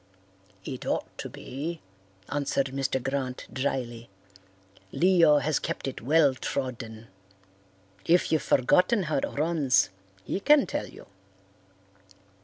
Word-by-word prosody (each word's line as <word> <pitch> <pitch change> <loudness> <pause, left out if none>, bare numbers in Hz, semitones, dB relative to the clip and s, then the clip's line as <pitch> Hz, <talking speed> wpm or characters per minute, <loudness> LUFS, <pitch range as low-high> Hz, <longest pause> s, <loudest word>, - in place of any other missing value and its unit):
"It 130 - -6
ought - - -3
to - - -5
be," 155 +6 -6 0.5
answered 140 -2 -1
Mr. 135 -1 -1
Grant 130 0 -3
drily; 120 -3 -3 0.8
"Leo 170 -4 +5
has 150 +1 +1
kept - - -4
it 135 - -5
well 145 +2 +4
trodden. 120 -4 -5 1.0
If 175 +2 +3
you've 160 -2 +3
forgotten 180 - +3
how 155 -2 -1
it - - 0
runs 150 -6 +1 0.3
he - - -3
can 295 +5 +5
tell 295 - -3
you." - - -13
140 Hz, 115 wpm, -27 LUFS, 130-165 Hz, 1.0 s, Leo